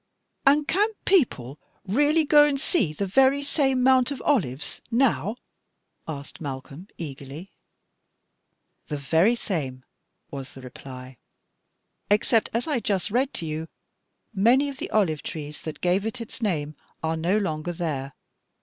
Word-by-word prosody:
"And 290 Hz, +2 st, +5 dB
can 405 Hz, +7 st, +3 dB, 0.2 s
people 150 Hz, -, +2 dB, 0.3 s
really 295 Hz, -, +3 dB
go 295 Hz, 0 st, +7 dB
and 290 Hz, -2 st, +1 dB
see 220 Hz, -, +1 dB
the 200 Hz, +6 st, -2 dB
very 270 Hz, +7 st, +4 dB
same 270 Hz, -3 st, +1 dB
Mount 260 Hz, -1 st, +5 dB
of 280 Hz, -, -4 dB
Olives 150 Hz, -, 0 dB
now?" 235 Hz, -3 st, +2 dB, 0.7 s
asked 145 Hz, -1 st, -7 dB
Malcolm, 140 Hz, +4 st, -7 dB
eagerly. 145 Hz, +3 st, -8 dB, 1.4 s
"The 150 Hz, -, -3 dB
very 165 Hz, -, +3 dB
same," 135 Hz, -, -4 dB, 0.5 s
was 135 Hz, -1 st, -7 dB
the 135 Hz, -, -10 dB
reply, 130 Hz, 0 st, -10 dB, 0.9 s
"except, 210 Hz, +2 st, +3 dB
as 230 Hz, +2 st, -1 dB
I 295 Hz, -6 st, 0 dB
just 200 Hz, -2 st, -1 dB
read 260 Hz, +5 st, +1 dB
to 165 Hz, -, -3 dB
you, 155 Hz, +1 st, -4 dB, 0.7 s
many 240 Hz, +8 st, +4 dB
of 275 Hz, -, -7 dB
the -, -, -4 dB
olive 170 Hz, -9 st, +1 dB
trees 150 Hz, -1 st, -7 dB
that 155 Hz, -, -7 dB
gave 180 Hz, +2 st, +2 dB
it 225 Hz, +3 st, -4 dB
its 230 Hz, +1 st, -8 dB
name 155 Hz, -8 st, -1 dB, 0.3 s
are 160 Hz, 0 st, 0 dB
no 170 Hz, +6 st, +1 dB
longer 170 Hz, -4 st, -2 dB
there. 145 Hz, -6 st, -3 dB
190 Hz, 140 wpm, -25 LUFS, -, 1.4 s, go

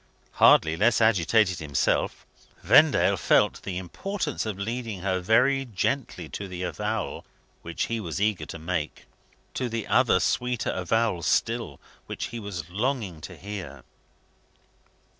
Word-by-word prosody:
Hardly 80 Hz, 0 st, +5 dB
less 110 Hz, +4 st, +3 dB
agitated 105 Hz, -2 st, +3 dB
himself, 70 Hz, -3 st, -1 dB, 0.4 s
Vendale -, -, +5 dB
felt -, -, +2 dB
the 95 Hz, -2 st, -5 dB
importance 150 Hz, -, -4 dB
of 105 Hz, -3 st, -4 dB
leading 110 Hz, -1 st, -4 dB
her 95 Hz, 0 st, 0 dB
very 125 Hz, +8 st, +3 dB
gently 115 Hz, -, -2 dB
to 100 Hz, -, -6 dB
the 90 Hz, -1 st, -6 dB
avowal 105 Hz, +4 st, -3 dB, 0.4 s
which 85 Hz, -2 st, -3 dB
he 115 Hz, 0 st, -2 dB
was 85 Hz, -4 st, -4 dB
eager 100 Hz, -6 st, 0 dB
to -, -, -7 dB
make 80 Hz, -1 st, -4 dB, 0.5 s
to 125 Hz, -2 st, -2 dB
the 115 Hz, -1 st, -3 dB
other 125 Hz, -7 st, +3 dB
sweeter 125 Hz, +6 st, 0 dB
avowal 95 Hz, 0 st, 0 dB
still, 115 Hz, -, 0 dB, 0.3 s
which -, -, -5 dB
he 120 Hz, -, -4 dB
was 95 Hz, -6 st, -6 dB
longing 105 Hz, -, -2 dB
to -, -, -9 dB
hear. 90 Hz, -10 st, -8 dB
100 Hz, 135 wpm, -26 LUFS, 90-115 Hz, 0.5 s, Hardly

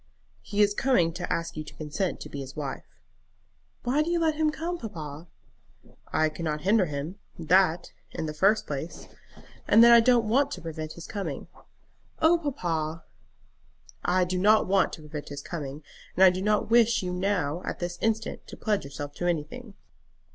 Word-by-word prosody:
"He 210 Hz, 0 st, +1 dB
is 205 Hz, 0 st, +2 dB
coming 205 Hz, -9 st, +2 dB
to 175 Hz, +1 st, -5 dB
ask 165 Hz, 0 st, -2 dB
you 155 Hz, -, -4 dB
to 150 Hz, -, -12 dB
consent 155 Hz, +5 st, -3 dB
to -, -, -7 dB
be 140 Hz, -, -6 dB
his 135 Hz, 0 st, -8 dB
wife." 145 Hz, -3 st, -6 dB, 0.9 s
"Why 265 Hz, +5 st, +2 dB
do 310 Hz, -, -1 dB
you 345 Hz, 0 st, +1 dB
let 320 Hz, -1 st, +2 dB
him 310 Hz, 0 st, +1 dB
come, 335 Hz, +3 st, -4 dB
papa?" 160 Hz, -7 st, -7 dB, 0.8 s
"I 155 Hz, -, +3 dB
cannot 155 Hz, -1 st, -3 dB
hinder 195 Hz, +1 st, +3 dB
him. 150 Hz, +7 st, -5 dB, 0.2 s
That, 175 Hz, +1 st, +2 dB, 0.2 s
in -, -, -5 dB
the 155 Hz, -, -4 dB
first 210 Hz, +7 st, +3 dB
place. 150 Hz, +3 st, -6 dB, 0.6 s
And 225 Hz, +3 st, +7 dB
then 235 Hz, -, +8 dB
I 235 Hz, -, +9 dB
don't 235 Hz, -1 st, +4 dB
want 275 Hz, +6 st, +3 dB
to -, -, -7 dB
prevent 155 Hz, -1 st, -5 dB
his 170 Hz, -, -10 dB
coming." 200 Hz, -2 st, -5 dB, 0.7 s
"Oh, 335 Hz, +2 st, +4 dB
papa!" 165 Hz, -, -3 dB, 1.0 s
"I 185 Hz, 0 st, +2 dB
do 180 Hz, 0 st, -1 dB
not 215 Hz, +3 st, +5 dB
want 195 Hz, +1 st, +2 dB
to 160 Hz, -, -7 dB
prevent 150 Hz, -1 st, -7 dB
his 145 Hz, 0 st, -7 dB
coming. 150 Hz, -3 st, -6 dB, 0.3 s
And 190 Hz, -, +6 dB
I 185 Hz, -, +9 dB
do 185 Hz, +1 st, -4 dB
not 210 Hz, +2 st, +1 dB
wish 235 Hz, -2 st, +4 dB
you 180 Hz, 0 st, -3 dB
now 180 Hz, -4 st, -1 dB
at -, -, -4 dB
this 175 Hz, 0 st, -5 dB
instant 220 Hz, -1 st, -1 dB
to -, -, -10 dB
pledge 210 Hz, -2 st, 0 dB
yourself 140 Hz, +1 st, -7 dB
to 175 Hz, -, -1 dB
anything." 175 Hz, +7 st, -3 dB
180 Hz, 185 wpm, -27 LUFS, 155-220 Hz, 1.0 s, I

